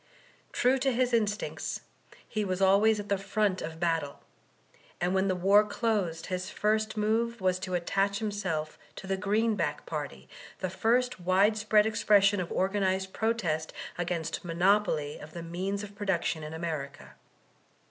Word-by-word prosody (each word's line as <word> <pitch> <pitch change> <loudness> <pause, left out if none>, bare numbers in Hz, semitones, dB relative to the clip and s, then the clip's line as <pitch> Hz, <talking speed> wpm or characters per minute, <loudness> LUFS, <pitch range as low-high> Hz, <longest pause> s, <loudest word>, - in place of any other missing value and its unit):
True 260 +2 +2
to 270 +1 +2
his 250 0 +1
instincts 215 -2 -1 0.5
he 215 -2 -2
was 185 -2 -2
always 200 +3 +4
at 205 - -6
the 200 -1 0
front 200 -1 0
of 160 +1 -6
battle, 165 -4 -1 0.8
and 180 +1 0
when 190 0 +2
the 185 - +1
war 195 +4 +5
closed 205 -6 -1
his 185 -1 -3
first 215 +1 0
move 225 +2 0
was 185 -1 +1
to 185 -1 -3
attach 195 +3 0
himself 190 -8 -3 0.2
to - - -9
the 195 0 0
Green 210 +3 +1
back - - -2
party, - - -5 0.3
the 185 - -3
first 240 +4 +1
widespread 210 +4 +3
expression 205 -2 +4
of 175 -2 -3
organittd 190 0 0
protest 185 -9 -1 0.2
against 170 -2 -3
monopoly 175 -3 +1
of 155 +1 -11
the 170 - -6
means 190 +4 -3
of 205 -1 -9
productioo 190 -5 -1
in 155 +1 -7
America. 140 - -5
195 Hz, 150 wpm, -29 LUFS, 175-210 Hz, 0.8 s, war